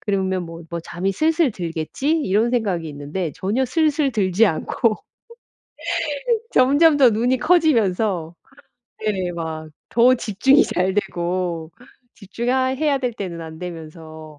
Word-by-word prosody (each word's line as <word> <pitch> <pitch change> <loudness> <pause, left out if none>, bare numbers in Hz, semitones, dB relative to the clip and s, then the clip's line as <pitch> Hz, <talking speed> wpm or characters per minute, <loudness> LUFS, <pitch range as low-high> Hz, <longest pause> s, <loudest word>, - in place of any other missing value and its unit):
그러면 190 -2 -1
뭐, 165 0 -10
뭐 170 0 -3
'잠이 180 +4 -3
슬슬 315 - +2
들겠지.' 175 - -2
이런 215 +2 +1
생각이 195 -9 -1
있는데 150 +4 -4
전혀 220 +8 0
슬슬 300 +1 +1
들지 205 -2 +2
않고 215 +6 0 1.6
점점 285 +4 +5
더 265 -3 +7
눈이 240 +4 +1
커지면서 215 - +2 0.7
네 190 -4 -1
막 160 -2 -5 0.2
더 245 +2 +5
집중이 255 - +3
잘되고 180 -3 -2 0.4
집중하 235 +6 -1
해야 285 0 +1
될 250 -2 -2
때는 180 -5 -6
안되면서 160 -2 -9
195 Hz, 240 characters per minute, -21 LUFS, 170-255 Hz, 1.6 s, 더